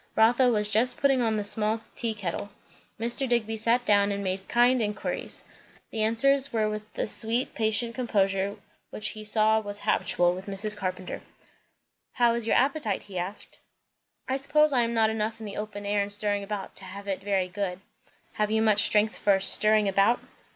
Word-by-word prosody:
Rotha 240 +3 +4
was 210 -3 0
just 225 +4 +2
putting 270 -2 +2
on 225 -2 +1
the 210 - -1
small 215 +2 +1
tea 230 -2 -2
kettle. 200 0 -4 0.5
Mr. 240 +3 0
Digby 225 -2 0
sat 230 +3 +1
down 205 -1 +3
and 200 0 -3
made 190 0 -3
kind 245 +1 +3
inquiries. 210 -1 -3 0.5
The 220 - -3
answers 270 +5 +3
were 220 -2 +1
with 215 0 -6
the - - -1
sweet 225 +4 +2
patient 225 +1 -1
composure 200 -5 0 0.3
which 215 - -3
he 215 -1 -8
saw 215 +1 +3
was 205 -1 -5
habitual 175 0 +1
with 185 +2 -8
Mrs. 205 +2 -1
Carpenter. 185 -2 -5 0.9
"How 240 -2 +3
is 235 -1 -2
your - - +2
appetite?" 265 -7 0
he 190 -3 -6
asked. 185 +4 -5 0.7
"I 265 - 0
suppose 290 +2 +2
I 250 - +3
am 235 0 -1
not 220 -1 +3
enough 220 +1 -2
in 220 - -8
the 205 - -7
open 210 -1 -6
air 205 0 +1
and 200 0 -3
stirring 205 0 +1
about, 200 -1 -6
to - - -8
have 200 +2 -9
it 195 -1 -2
very 195 -2 0
good." 185 -1 -4 0.5
"Have 210 0 -1
you 220 0 +1
much 210 -2 +4
strength 210 +1 +2
for 195 -1 +3
'stirring 215 +2 +2
about'?" 200 +5 +3
215 Hz, 185 wpm, -27 LUFS, 200-230 Hz, 0.9 s, Rotha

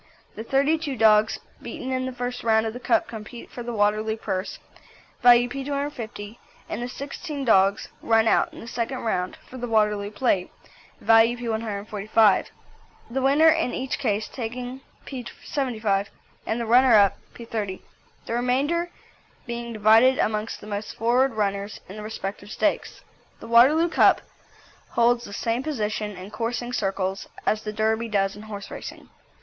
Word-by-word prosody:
The 220 - -7
thirty 280 +6 +2
two 290 -4 -3
dogs 215 0 +4 0.2
beaten 260 - -6
in 255 0 -1
the - - -3
first 245 0 -4
round 220 -1 +3
of 220 - -3
the 245 - -7
Cup 235 -3 +1
compete 230 +1 -9
for 245 - -7
the 240 0 -5
Waterloo 215 0 +1
Purse, 190 -3 -3 0.6
value 245 0 +7
P215, 270 -5 -5 0.3
and - - -4
the 245 - -3
sixteen 280 +2 -6
dogs 195 -3 +3
run 225 0 +3
out - - +3
in - - -11
the 230 - -10
second 235 +3 -3
round 185 -5 -2
for 255 - -9
the 245 - -3
Waterloo 210 -2 +1
Plate, 205 -4 0 0.5
value 225 +1 +5
P145. 215 -2 +1 0.6
The 265 +2 -1
winner 285 +5 +5
in 325 -5 +1
each 260 0 -3
case 215 -5 0
taking 245 +2 -6 0.2
P75, 230 -5 -2 0.4
and 225 - -1
the 235 - -2
runner 245 +1 +6
up 200 -2 +4 0.2
P30, 215 -5 -4 0.4
the - - -4
remainder 275 +8 0 0.6
being 235 -1 -5
divided 225 +4 +5
amongst 215 +1 -1
the - - -10
most 210 0 -5
forward 245 +4 +2
runners 200 -1 -2
in 195 - -9
the - - -6
respective 205 -1 -6
stakes. 310 +8 -1 0.4
The - - -10
Waterloo 275 +9 +5
Cup - - +4 0.7
holds 240 0 +3
the - - -10
same 230 +3 -1
position 215 -8 -3
in 185 +3 -9
coursing 240 +2 -3
circles 195 -3 -2 0.2
as 215 - +1
the 215 - -4
Derby 220 +2 0
does 195 -2 +1
in 205 - -10
horse 210 -2 -8
racing. - - -8
230 Hz, 155 wpm, -24 LUFS, 210-250 Hz, 0.7 s, value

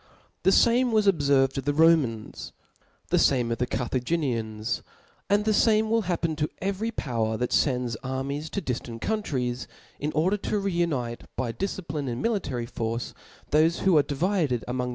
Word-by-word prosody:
The 190 - +4
fame 240 +4 +4
was 215 -2 +3
pbfdrvtdof 140 -6 +3
the 145 +1 0
Romans;* 150 -9 +2 0.6
the - - +3
fame 125 -4 +3
ofthe 120 +1 -1
Carthaginians 120 -3 -1 0.2
\ - - -35
and 205 +1 +3
the 215 - +3
fame 220 0 +3
will 230 0 +3
happen 165 -2 0
to 150 0 0
every 200 +3 -2
power 115 - -2
that 125 +1 -2
fends 125 -4 +1
armies 135 +5 -4
to 200 - -3
diftant 115 -2 -4
cDuntdes,^ 130 - -2 0.3
in 150 +2 -2
or^ 185 +6 +1
dei:|o 210 - -1
re 195 -2 -1
uniterby 125 -6 -2
difcipline 155 -7 -3
and 120 0 -3
military 145 - -1
force, 115 0 -4 0.4
thol6 160 +3 +4
who 190 -3 +4
are 150 - +7
(Kvided 150 - 0
among. 125 0 -2
145 Hz, 155 wpm, -26 LUFS, 125-190 Hz, 0.6 s, are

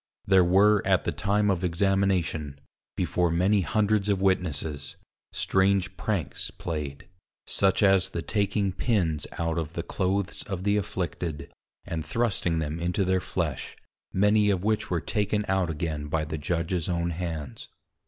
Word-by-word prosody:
There 95 -1 +5
were 100 +3 +5
at - - +2
the - - -1
time 105 +1 +1
of 95 -1 -1
Examination, 90 -5 0 0.4
before 90 -1 +1
many 95 +5 +3
hundreds 105 +1 +1
of 100 -2 +2
Witnesses, 80 -6 -1 0.4
strange 95 -1 +1
Pranks 85 -5 -2
play'd; 75 -3 -5 0.4
such 95 +1 +2
as 95 -2 +4
the 85 - -4
taking 100 -1 0
Pins 90 - 0
out 85 0 -1
of 80 0 -5
the 85 - -3
Clothes 95 +1 -1
of 95 -3 -4
the 100 +1 +2
afflicted, 85 -5 -3 0.3
and 80 -2 -3
thrusting 100 -7 0
them 80 0 -2
into 90 +3 0
their 95 0 +1
flesh, 80 -9 -3 0.3
many 105 +2 +3
of 95 -2 0
which 110 0 0
were 85 -3 0
taken 105 -1 0
out 95 -3 +1
again 75 -2 -3
by 75 +1 -1
the 80 0 -4
Judges 85 +2 -1
own 85 -1 0
hands. 80 -6 -5
90 Hz, 150 wpm, -27 LUFS, 80-100 Hz, 0.4 s, There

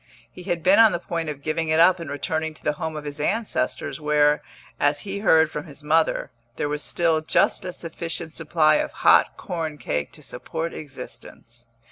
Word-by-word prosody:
He - - -11
had 175 -4 -2
been 190 +4 +5
on 225 -4 +7
the - - +1
point 165 -2 -3
of 145 -2 -7
giving 160 +1 -1
it 155 +1 +3
up 180 +2 +6
and 165 -4 -6
returning 155 +2 -2
to - - -18
the 150 - +2
home 160 -1 -3
of 150 - -5
his 145 -1 -7
ancestors, 205 -1 -1
where, 150 -1 +3 0.4
as 145 0 +2
he 200 0 -4
heard 160 -6 +4
from 150 +1 -5
his 145 0 -13
mother, 160 +2 +1 0.2
there - - -2
was 150 0 -2
still 165 -1 +1
just 155 - +2
a 180 - -3
sufficient 165 -1 -4
supply 155 -1 +3
of - - -2
hot - - +5
corn 160 -4 -4
cake 75 - -3
to - - -12
support 165 +1 -5
existence. 120 -4 -10
160 Hz, 195 wpm, -24 LUFS, 150-170 Hz, 0.4 s, on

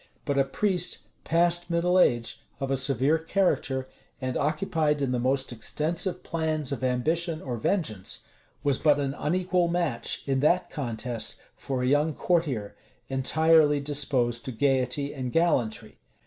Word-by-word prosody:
But 140 -2 0
a 135 - +4
priest, 180 +5 0 0.3
past 175 +1 +2
middle 175 +2 +2
age, 120 -8 +2 0.2
of 135 0 -2
a - - +3
severe 135 +3 +2
character, 160 -6 0 0.3
and 130 -1 -3
occupied 150 0 0
in 135 -3 0
the 125 - 0
most 130 +2 0
extensive 165 - -2
plans 155 -4 -2
of 140 - -4
ambition 155 +7 0
or 125 -5 -4
vengeance, 110 - -2 0.4
was 140 -3 +2
but 150 -2 +4
an 140 -1 -1
unequal 180 +3 +1
match, 170 -8 -1
in 135 -1 0
that 170 +6 +2
contest, 120 -3 -2 0.2
for 130 -2 -3
a - - +1
young 145 +3 +2
courtier, 145 - -1 0.3
entirely 150 +2 +4
disposed 135 -5 0
to 130 - -4
gayety 135 +2 0
and 130 -3 -4
gallantry. 150 -10 0
145 Hz, 145 wpm, -27 LUFS, 130-165 Hz, 0.4 s, a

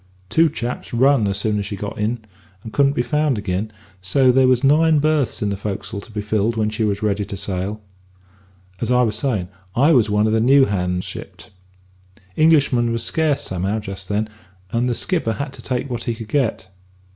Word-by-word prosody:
Two 165 0 +4
chaps 120 -4 -5
run 130 -3 +4
as 100 0 -1
soon 105 0 0
as 100 - -3
she 105 - -4
got 100 +1 -5
in, 110 +2 -2 0.4
and 110 - -9
couldn't 140 -1 +3
be 120 - 0
found 150 -2 +1
agin; 105 +1 -2 0.3
so 130 +8 +3
there 130 +1 +4
was 130 0 +3
nine 155 +3 +4
berths 150 -6 +1
in 100 - 0
the - - -1
fo'c'sle 100 +1 -5
to 110 - -15
be 105 -1 -4
filled 110 +2 0
when 110 -1 0
she 110 +1 -2
was 105 -1 -1
ready 105 -1 0
to 100 - -6
sail. 95 +3 -4 1.0
As 115 - -2
I 125 0 +4
was 110 -3 0
savin', 110 -7 -1 0.3
I 140 +6 +4
was 120 -8 +4
one 105 +1 +2
of 110 - +1
the 110 - +2
new 135 +3 +6
hands 90 -3 -1
shipped. - - -9 0.8
Englishmen 140 -7 +3
was 115 0 -1
scarce 155 -1 0
somehow 95 +3 -2
just 100 -3 -6
then, 105 +1 0 0.4
and 120 +1 0
the 120 - 0
skipper 165 -10 -1
had 140 +4 -5
to - - -11
take 130 +1 -2
what 120 -3 -4
he 120 - -1
could 110 -2 -9
get. 115 -8 -1
115 Hz, 205 wpm, -20 LUFS, 105-135 Hz, 1.0 s, new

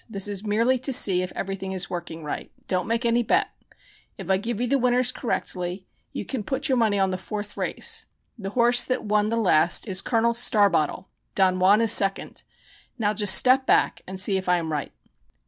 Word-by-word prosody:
This 195 -2 0
is 205 -1 -5
merely 230 +5 +1
to 260 +2 -1
see 190 -7 +5
if 185 - -5
everything 195 0 -5
is 190 0 +1
working 170 -2 -7
right. 150 - -6 0.2
Don't 185 +1 -2
make 230 +1 -2
any 235 +1 +2
bet. 230 - 0 0.7
If - - -5
I 190 - +3
give 230 +2 -5
you 245 - 0
the 275 +3 0
winners 250 0 +1
correctly, 185 -5 -4 0.3
you - - -6
can 260 -5 -4
put 265 +7 -2
your 260 -3 +1
money 215 -3 +1
on 190 -1 +1
the 185 - -4
fourth 205 +1 -7
race. - - -3 0.3
The 200 -6 -7
horse 240 +3 +3
that 255 0 -2
won 210 0 +1
the 230 - -1
last 175 -3 +3
is 190 -2 +2
Col. 235 0 0
Starbottle 205 - +1 0.3
Don 185 -1 +2
Juan 200 +4 +4
is 225 -2 +3
second. 195 0 +2 0.6
Now 210 -3 0
just 205 -1 +4
step 260 +1 +4
back - - +1
and 190 0 -7
see 190 +1 +2
if 185 -1 -5
I 180 - +3
am 165 -2 -4
right." 150 -2 -4
205 Hz, 205 wpm, -24 LUFS, 190-235 Hz, 0.7 s, see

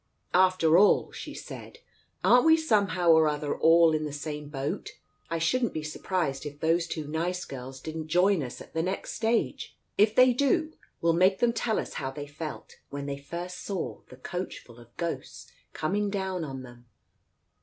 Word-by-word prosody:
"After 180 -2 +5
all," 205 - +4
she - - -8
said, - - -9 0.5
"aren't 245 +3 +6
we 320 0 +7
somehow 200 - +2
or 160 -1 +6
other 150 -1 -1
all 165 0 +5
in 155 0 0
the 150 - -4
same 150 0 -5
boat? 140 -1 -4 0.4
I 165 - -1
shouldn't 235 +9 +1
be 155 - -2
surprised 155 -3 -2
if 145 -1 -8
those 165 +2 +2
two 155 -2 -4
nice 175 +4 -2
girls 130 0 -8
didn't 160 +2 -6
join 180 +2 +3
us 125 -3 -6
at - - -13
the 160 - 0
next 185 +3 -3
stage. 225 0 -1 0.2
If 210 +1 +4
they 255 0 +6
do, 310 +5 +1 0.3
we'll 165 0 +3
make 185 +3 +4
them 235 +1 +2
tell 225 -1 0
us - - -3
how 130 - -2
they 145 +2 -6
felt, 150 +2 -8
when 140 0 -5
they 140 0 -4
first 175 +5 -6
saw 195 -4 -4
the 125 - -12
coachful 130 -6 -6
of 120 0 -18
ghosts 170 -1 -5 0.2
coming 205 +6 -1
down 190 -3 -2
on 135 -3 -6
them. 120 -1 -14
165 Hz, 180 wpm, -28 LUFS, 145-190 Hz, 0.5 s, we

